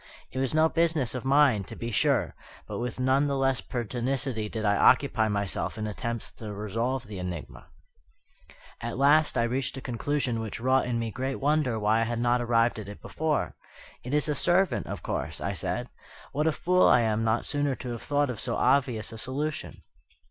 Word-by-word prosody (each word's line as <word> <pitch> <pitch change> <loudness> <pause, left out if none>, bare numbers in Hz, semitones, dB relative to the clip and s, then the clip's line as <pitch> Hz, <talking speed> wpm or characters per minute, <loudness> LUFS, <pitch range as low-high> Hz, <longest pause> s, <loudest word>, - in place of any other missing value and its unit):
It 130 - -4
was 135 +2 0
no 155 +1 +5
business 160 -7 +1
of 125 - -4
mine, 135 -6 +4
to - - -8
be 120 0 -5
sure; 105 - +2 0.3
but - - -5
with 125 +1 -4
none 130 +3 +3
the 140 -1 0
less 135 -2 +1
pertinacity 120 -1 -2
did 110 -1 -3
I 100 0 +3
occupy 110 0 +4
myself 100 0 -2
in 110 - -3
attempts 115 +2 -4
to 110 -2 -6
resolve 115 +5 -2
the 105 -3 -7
enigma. 90 -3 -6 1.1
At 120 +1 -4
last 150 +3 +4
I 115 - +3
reached 130 +3 -1
a - - -3
conclusion 125 0 -1
which 110 0 -5
wrought 130 +2 +2
in 120 -1 0
me 115 -1 -2
great 130 +4 -3
wonder 145 -4 +1
why 110 +1 +2
I - - +2
had 120 +1 -2
not 120 +1 +2
arrived 115 -1 +2
at 100 -2 -7
it 100 - -9
before. 155 -2 -1 0.5
"It 125 +4 -2
is 150 +1 +2
a 150 - +1
servant, 180 +6 +2
of - - -6
course," - - -3
I - - -2
said; - - -2 0.4
"what 150 +3 0
a - - +4
fool 180 +4 +3
I 120 - +6
am 110 -1 +1
not 115 +1 +1
sooner 145 -2 0
to 125 -1 -6
have 115 - -5
thought 145 -2 +1
of 115 - -7
so 120 -2 -2
obvious 125 -4 +1
a 115 - -7
solution!" 145 +5 -4
125 Hz, 200 wpm, -28 LUFS, 115-140 Hz, 1.1 s, I